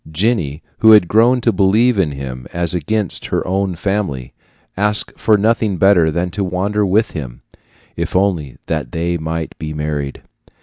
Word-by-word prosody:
Jenny, 85 - -1 0.2
who 110 0 +7
had 105 -5 +6
grown 120 +5 +3
to - - +2
believe 105 +4 +3
in 80 -6 +1
him 65 -2 -7
as 85 0 +1
against 95 +4 -2
her - - -1
own 95 0 -1
family, 90 -9 -3 0.4
asked 105 +1 0
for 110 -1 +3
nothing 110 -2 +1
better 90 -3 +4
than 85 +3 -2
to 100 +3 -2
wander 95 +3 -1
with 105 +3 +1
him, 65 -7 -7 0.5
if - - -4
only 90 -8 0
they 80 +4 -2
might 80 +1 -4
be 75 -1 -5
married. 75 -2 -4
90 Hz, 160 wpm, -17 LUFS, 80-105 Hz, 0.5 s, who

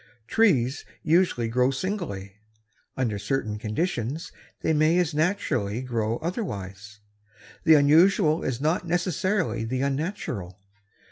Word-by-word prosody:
Trees 145 - +2 0.2
usually 160 -8 +2
grow 125 +3 +2
singly. 135 - -4 0.6
Under 115 -6 -1
certain 105 -1 -2
conditions 130 - -2 0.3
they 160 - +1
may 155 +3 +3
as 175 -4 +1
naturally 145 - 0
grow 115 -2 -1
otherwise. 105 - -5 0.6
The 160 - +8
unusual 155 +2 +4
is 125 -2 -2
not 160 +4 0
necessarily 175 - 0
the 130 +3 -2
unnatural. 135 - -3
135 Hz, 110 wpm, -26 LUFS, 110-170 Hz, 0.6 s, The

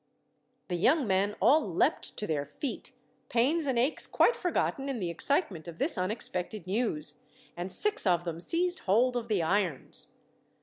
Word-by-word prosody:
The 180 - -2
young 270 - +3
men 200 +1 +1
all 310 +3 +5
leapt 165 - 0
to 210 - -2
their 150 -5 -1
feet, 195 - -6 0.4
pains 285 +7 +1
and 260 -3 0
aches 255 +6 0
quite 480 - +3
forgotten 280 -6 -1
in 265 -4 -3
the 175 -4 -2
excitement 185 - +2
of 165 -1 -8
this - - +1
unexpected 185 0 -2
news, 190 -4 0 0.4
and 175 +2 -5
six 420 - 0
of 175 -2 +2
them 170 -1 -5
seized 355 - +1
hold 240 +6 +2
of 235 -1 -3
the 205 -6 +1
irons. 180 -4 -1
210 Hz, 165 wpm, -29 LUFS, 175-270 Hz, 0.4 s, all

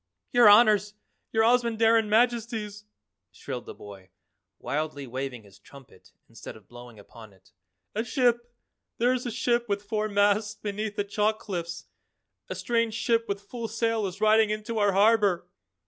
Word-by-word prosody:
"Your 240 -3 +7
Honors! 210 -1 +5 0.4
Your 220 0 +2
Ozamandarin 230 -2 +3
Majesties!" 220 -2 0 0.5
shrilled - - -7
the - - -9
boy, 100 -2 -13 0.5
wildly 150 -1 -4
waving 130 -1 -6
his 100 -1 -19
trumpet 135 +5 -17 0.2
instead - - -11
of 105 - -21
blowing 120 -1 -13
upon 110 0 -14
it. 95 0 -26 0.4
"A 220 - -1
ship 240 -2 0 0.5
there 245 +2 +2
is 250 -1 -3
a - - -3
ship 240 0 -1
with 200 0 -1
four 215 0 -2
masts 205 +1 +1
beneath 210 0 -5
the 205 - -1
chalk 210 +2 0
cliffs, 170 -5 -6 0.6
a - - -4
strange 230 -2 -1
ship 230 0 0
with 200 0 -3
full 230 +3 -7
sail 225 -1 -1
is 185 +1 -8
riding 215 0 +4
into 215 +1 -3
our 205 -1 +2
harbor." 205 -3 +3
210 Hz, 155 wpm, -26 LUFS, 185-230 Hz, 0.6 s, Your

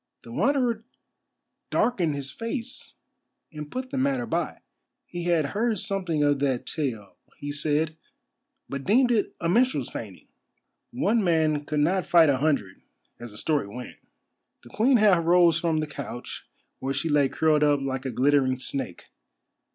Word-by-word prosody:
The 115 - -11
Wanderer 245 - +1 0.9
darkened 175 -11 +1
his 140 -1 -5
face 230 +1 -5 0.6
and 150 -1 -7
put 255 - -5
the 275 - -1
matter 265 -2 0
by. - - -3 0.4
He 175 -1 -6
had 170 -4 +2
heard 220 +1 0
something 185 -7 -1
of 145 -1 +2
that 135 -3 0
tale, 120 -10 -4 0.2
he 145 -1 -5
said, 155 +2 0 0.7
but 140 0 -5
deemed 245 - +3
it 220 -4 0
a 165 - -1
minstrel's 245 +9 +2
feigning. - - -8 0.6
One 240 -3 +1
man 155 -4 +1
could 150 0 0
not 180 +5 +1
fight 165 -3 +6
a 135 - +3
hundred, 135 -10 -1 0.4
as 120 - -8
the 105 - -13
story 150 -4 0
went. 125 +4 -9 0.7
The 120 - -14
Queen 245 - +3
half 200 -6 +4
rose 170 -1 +4
from 165 -3 0
the - - -1
couch 140 -4 -8 0.3
where 135 +1 -2
she 140 - -1
lay 145 -3 +3
curled 155 0 +2
up 145 -1 +3
like 135 -1 -3
a 130 - -3
glittering 130 +1 +2
snake. 130 -7 -4
155 Hz, 160 wpm, -26 LUFS, 140-205 Hz, 0.9 s, fight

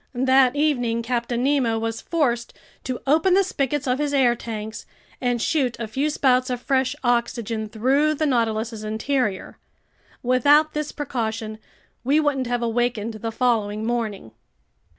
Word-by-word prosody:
That 260 +1 +4
evening 245 -6 +1
Captain 240 0 -1
Nemo 260 -5 +2
was 225 0 -3
forced 245 -8 -1 0.3
to 255 -2 -4
open 320 +6 +3
the 395 - +5
spigots 290 -6 -2
of 255 +1 0
his 290 -1 0
air 250 -3 +4
tanks 220 -2 -7 0.3
and 245 -2 0
shoot 255 -1 0
a 230 - -3
few 270 +8 -1
spouts 255 -3 +2
of 250 -1 -2
fresh 260 +1 0
oxygen 235 -3 -1
through 270 +8 +2
the 310 - 0
Nautilus's 225 -4 0
interior. 220 -1 -2 0.6
Without 285 +5 +4
this 300 0 -3
precaution 225 -6 -4 0.4
we 280 +5 +3
wouldn't 280 -4 0
have 240 0 -1
awakened 230 -1 -1
the 225 +1 -5
following 220 -3 0
morning. 220 - -3
245 Hz, 145 wpm, -23 LUFS, 225-275 Hz, 0.6 s, the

